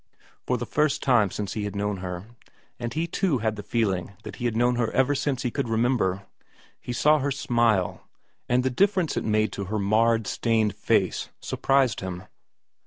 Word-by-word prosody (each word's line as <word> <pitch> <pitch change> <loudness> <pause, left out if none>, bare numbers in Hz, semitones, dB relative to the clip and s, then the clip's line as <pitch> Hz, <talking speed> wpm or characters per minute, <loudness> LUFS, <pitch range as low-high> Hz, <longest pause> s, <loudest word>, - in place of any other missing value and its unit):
For 125 - +1
the 120 - -4
first 150 +5 0
time 120 -7 +4
since 100 +1 -4
he 105 - -3
had 105 - -5
known 105 0 -1
her 90 0 -6 0.5
and 120 -1 -3
he 160 +4 -1
too 170 -3 0
had 110 -1 -1
the 105 - -6
feeling 100 -4 -1
that - - -8
he 120 - -4
had 115 -2 0
known 120 +1 +2
her 115 -2 +1
ever 130 +2 +3
since 140 -1 -1
he 125 - -1
could 135 -3 -2
remember 110 -5 +1 0.5
he - - -6
saw 150 +5 +4
her 140 +1 -1
smile, 120 -8 0 0.4
and 125 +1 +3
the 130 - 0
difference 185 +3 +2
it - - -1
made 110 0 +1
to 100 - -5
her 110 +3 -2
marred, 110 +2 +2
stained 110 -2 +1
face - - 0
surprised 135 -3 +1
him. 95 -1 -5
115 Hz, 190 wpm, -25 LUFS, 105-130 Hz, 0.5 s, time